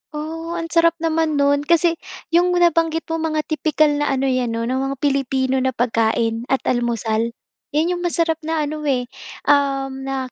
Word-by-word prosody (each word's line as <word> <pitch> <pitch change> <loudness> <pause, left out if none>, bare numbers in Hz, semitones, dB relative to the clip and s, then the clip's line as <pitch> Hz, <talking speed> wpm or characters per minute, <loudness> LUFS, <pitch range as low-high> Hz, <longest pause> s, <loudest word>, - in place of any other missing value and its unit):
Oh, 325 +2 -5
ang 330 -1 -4
sarap 335 0 +4
naman 320 -1 +1
no'n. 285 +1 +2
Kasi, 335 0 +3 0.3
yung 355 +1 +3
nabanggit 330 -2 +2
mo 325 - -1
mga 310 -1 -1
tipikal 310 0 +1
na 290 0 0
ano 270 0 0
yan 255 -3 0
'no, 230 - -2
na 255 +3 -1
mga 270 +1 -2
Pilipino 265 -1 +1
na 260 -1 -1
pagkain 230 0 0
at 270 - 0
almusal. 230 -1 -1 0.4
Yan 320 +4 +2
yung 355 - -2
masarap 335 -2 0
na 320 -1 -1
ano 300 0 -4
eh, 255 -3 +1 0.4
na 270 -2 0
290 Hz, 170 wpm, -20 LUFS, 260-325 Hz, 0.4 s, sarap